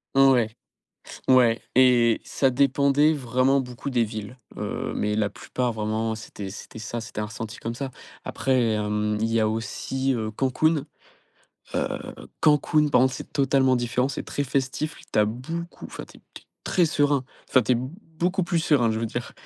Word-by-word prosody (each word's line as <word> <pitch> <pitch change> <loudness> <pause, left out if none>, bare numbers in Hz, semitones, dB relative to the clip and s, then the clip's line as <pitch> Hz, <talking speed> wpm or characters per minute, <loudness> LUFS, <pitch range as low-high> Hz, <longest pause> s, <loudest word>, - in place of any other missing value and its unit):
N 135 0 +7
ouais. 120 -4 +3 0.8
Ouais 120 -3 +5
et 120 -3 +5
ça 135 - +1
dépendait 140 +3 +3
vraiment 130 0 +2
beaucoup 125 +2 -6
des 120 -3 +2
villes. 110 +3 -7 0.2
Heu, - - -3
mais 105 0 -1
la 105 -2 +1
plupart, 125 -2 -3
vraiment, 110 +1 -1
c'était 105 -3 -8
c'était 110 - -10
ça, 115 +2 -4
c'était 110 -1 -6
un 105 - -2
ressenti 110 +1 -7
comme 115 +1 -4
ça. 135 +1 -4 0.3
Après 130 -4 +1
hem, 105 0 -1
il 110 - +2
y 115 - +3
a 110 - +3
aussi, 125 +5 -2
heu, 110 -2 -2
Cancún. 135 +6 +1 0.9
Heu, - - -1 0.4
Cancún, 150 0 +3
par 125 -3 +5
contre, 130 - +3
c'est - - -9
totalement 135 -2 +3
différent, 125 +2 0
c'est 140 - -4
très 145 - -2
festif. 135 +3 -2 0.2
Tu - - +1
as 105 - +6
beaucoup 165 +10 -6
enfin, - - -8
tu - - -17
es - - -26
tu - - -10
es - - -34 0.2
très 175 -3 +3
serein. 145 -3 +1 0.2
Enfin, 130 - +4
tu 125 +3 +2
es - - +3
beaucoup 170 - -3
plus 170 -1 0
serein, 140 -8 +3
je 110 - -1
veux 115 - -1
dire, 120 +2 -5
125 Hz, 185 wpm, -25 LUFS, 110-140 Hz, 0.9 s, N